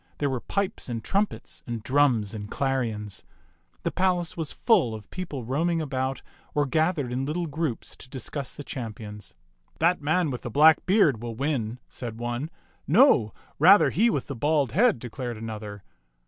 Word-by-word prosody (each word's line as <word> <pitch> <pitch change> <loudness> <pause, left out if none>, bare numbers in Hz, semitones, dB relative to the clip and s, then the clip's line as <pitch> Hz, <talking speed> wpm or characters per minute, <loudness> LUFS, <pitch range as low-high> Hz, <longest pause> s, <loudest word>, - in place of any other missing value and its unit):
There 145 -2 0
were 130 - -1
pipes 200 -8 -2
and 115 -2 -4
trumpets 200 +1 -1
and 115 -3 -4
drums 125 -6 +2
and 105 -1 -6
clarions. 115 -8 -2 0.6
The - - 0
palace 180 -2 0
was 160 -3 -2
full 125 - +2
of 105 -2 -10
people 160 -8 -5
roaming 165 +7 0
about 135 -3 -2 0.3
or 145 -1 +3
gathered 155 -1 0
in 130 +2 -1
little 160 +5 -2
groups 150 -5 -3
to 130 - -11
discuss 130 +1 -4
the 145 - -7
champions. 105 - -7 0.4
"That 170 +1 +2
man 160 +1 +1
with 125 - -5
the - - -5
black 155 +6 +5
beard 180 - +4
will 120 -1 -5
win," 125 -4 -1
said 115 -3 -7
one. 120 +5 -3 0.4
"No, 155 - +5 0.3
rather 190 +7 +7
he 230 +4 +3
with 140 - -1
the 140 - -6
bald 145 0 +1
head," 230 - +4
declared 120 0 -6
another. 105 -2 -7
135 Hz, 165 wpm, -26 LUFS, 115-160 Hz, 0.6 s, rather